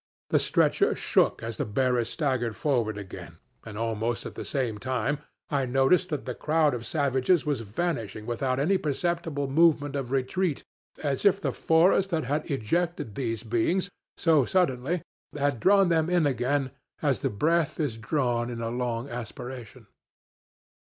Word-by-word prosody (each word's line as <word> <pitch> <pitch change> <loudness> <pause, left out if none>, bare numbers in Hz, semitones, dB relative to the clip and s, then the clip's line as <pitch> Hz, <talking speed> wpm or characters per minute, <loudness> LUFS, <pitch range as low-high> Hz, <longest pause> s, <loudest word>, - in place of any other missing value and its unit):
The - - +4
stretcher - - +2
shook - - +1
as 115 0 -5
the - - 0
bearers 120 +1 +1
staggered 130 -7 -1
forward 120 -8 0
again, 90 -4 -9 0.3
and 110 -2 -8
almost 115 +1 -2
at - - -6
the - - -6
same 120 -7 -2
time 130 +4 -1 0.3
I 140 -3 +1
noticed 135 +8 +3
that 150 -4 -3
the 125 - -3
crowd 155 0 +2
of 120 -2 -4
savages 140 +3 +2
was 145 -5 0
vanishing 110 - -3
without 130 +2 -1
any 185 +7 +2
perceptible 155 -1 -1
movement 145 -1 +3
of 135 -3 -3
retreat, 140 +5 -1 0.4
as 140 -3 -1
if 195 -1 +4
the - - -1
forest 180 +4 +3
that 165 -4 0
had 150 +6 -2
ejected 150 - -1
these 115 -2 -3
beings 125 - 0 0.3
so 160 -5 +4
suddenly 155 0 0 0.3
had 140 -3 0
drawn 195 - +5
them 165 -1 +2
in 175 -3 +3
again 135 +1 0 0.3
as 140 -4 +2
the 135 - 0
breath 155 +9 +1
is 145 -8 -1
drawn 120 0 -1
in 120 -1 -5
a 115 0 -3
long 120 0 -2
aspiration. 120 -1 -8
135 Hz, 155 wpm, -27 LUFS, 120-160 Hz, 0.4 s, drawn